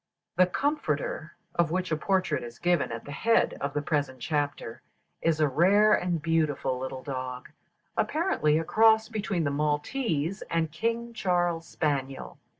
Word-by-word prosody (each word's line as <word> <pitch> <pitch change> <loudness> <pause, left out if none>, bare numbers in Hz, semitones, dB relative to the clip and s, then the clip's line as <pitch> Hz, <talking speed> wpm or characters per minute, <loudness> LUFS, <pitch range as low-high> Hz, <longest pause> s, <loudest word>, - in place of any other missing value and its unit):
The 185 - +5
Comforter, 310 - -2 0.2
of 170 -2 +2
which 185 +1 -2
a - - +3
portrait 180 -3 0
is 120 0 -9
given 175 -7 +1
at 115 0 -6
the 145 - -8
head 225 +10 +2
of 140 +1 -3
the 145 - 0
present 145 -4 -1
chapter, 145 -5 -2 0.4
is 165 -2 +1
a 155 - +4
rare 195 +9 +4
and 175 -4 +1
beautiful 155 -5 0
little 130 0 -5
dog, 130 -2 -5 0.5
apparently 310 - +1
a 165 - 0
cross 220 +4 +4
between 200 -6 -1
the 145 - 0
Maltese 150 - -1
and 165 -2 0
King 230 +7 -2
Charles 175 -5 0
spaniel. 135 -4 -3
165 Hz, 155 wpm, -28 LUFS, 145-195 Hz, 0.5 s, The